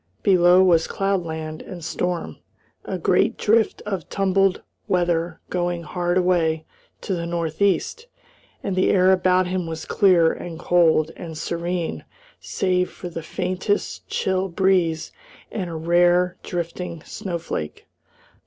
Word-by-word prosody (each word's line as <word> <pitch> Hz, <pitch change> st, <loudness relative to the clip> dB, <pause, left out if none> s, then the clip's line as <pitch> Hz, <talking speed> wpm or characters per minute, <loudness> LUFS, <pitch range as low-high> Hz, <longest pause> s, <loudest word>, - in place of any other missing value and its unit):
Below 180 Hz, -1 st, +6 dB
was 170 Hz, -3 st, +4 dB
cloudland 160 Hz, -5 st, -2 dB
and 175 Hz, -4 st, -9 dB
storm, 175 Hz, 0 st, -3 dB, 0.5 s
a -, -, -3 dB
great -, -, +2 dB
drift 220 Hz, +1 st, +2 dB
of 195 Hz, -5 st, -4 dB
tumbled 195 Hz, -1 st, +1 dB, 0.2 s
weather 175 Hz, -2 st, 0 dB
going 175 Hz, -1 st, -1 dB
hard 175 Hz, +2 st, -1 dB
away 165 Hz, -3 st, +1 dB, 0.4 s
to 195 Hz, -, -3 dB
the 170 Hz, -1 st, -3 dB
north 170 Hz, 0 st, -3 dB
east, 200 Hz, -, +1 dB, 0.6 s
and 195 Hz, -, -2 dB
the 185 Hz, -, +2 dB
air 185 Hz, -1 st, +5 dB
about 185 Hz, 0 st, +3 dB
him 180 Hz, -1 st, -2 dB
was 160 Hz, -1 st, -5 dB
clear 180 Hz, -5 st, +4 dB
and 170 Hz, -2 st, -7 dB
cold 165 Hz, -3 st, +3 dB
and 160 Hz, -2 st, -8 dB
serene 170 Hz, +1 st, -3 dB, 0.4 s
save 180 Hz, -1 st, 0 dB
for 180 Hz, -, -8 dB
the 165 Hz, -1 st, -6 dB
faintest 185 Hz, +5 st, -2 dB
chill 190 Hz, 0 st, 0 dB
breeze 175 Hz, -3 st, +1 dB, 0.4 s
and 185 Hz, -5 st, -3 dB
a 165 Hz, -, -6 dB
rare, 175 Hz, +2 st, +3 dB
drifting 170 Hz, -1 st, -5 dB
snow 180 Hz, -3 st, -5 dB
flake. 75 Hz, -, -5 dB
175 Hz, 135 wpm, -23 LUFS, 165-185 Hz, 0.6 s, Below